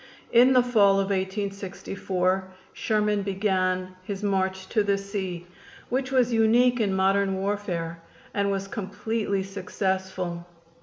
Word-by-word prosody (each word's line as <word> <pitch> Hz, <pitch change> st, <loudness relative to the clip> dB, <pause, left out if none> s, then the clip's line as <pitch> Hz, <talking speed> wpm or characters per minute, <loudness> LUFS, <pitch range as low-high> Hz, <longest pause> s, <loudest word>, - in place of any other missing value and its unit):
In 245 Hz, +2 st, +6 dB
the 250 Hz, -1 st, +5 dB
fall 215 Hz, -5 st, +4 dB
of 195 Hz, 0 st, +1 dB
1864 190 Hz, -1 st, -2 dB, 0.3 s
Sherman 210 Hz, -1 st, +1 dB
began 185 Hz, -2 st, 0 dB
his 200 Hz, +1 st, -5 dB
march 190 Hz, -1 st, 0 dB
to 220 Hz, -, +2 dB
the 200 Hz, -1 st, +1 dB
sea, 190 Hz, -3 st, -4 dB, 0.4 s
which 260 Hz, +1 st, -1 dB
was 250 Hz, -2 st, +3 dB
unique 240 Hz, +2 st, +4 dB
in 205 Hz, -3 st, +1 dB
modern 195 Hz, +1 st, +2 dB
warfare, 190 Hz, -4 st, -3 dB, 0.3 s
and 200 Hz, 0 st, +1 dB
was 195 Hz, 0 st, -2 dB
completely 200 Hz, 0 st, -2 dB
successful. 190 Hz, -2 st, -3 dB
195 Hz, 120 wpm, -26 LUFS, 190-210 Hz, 0.4 s, In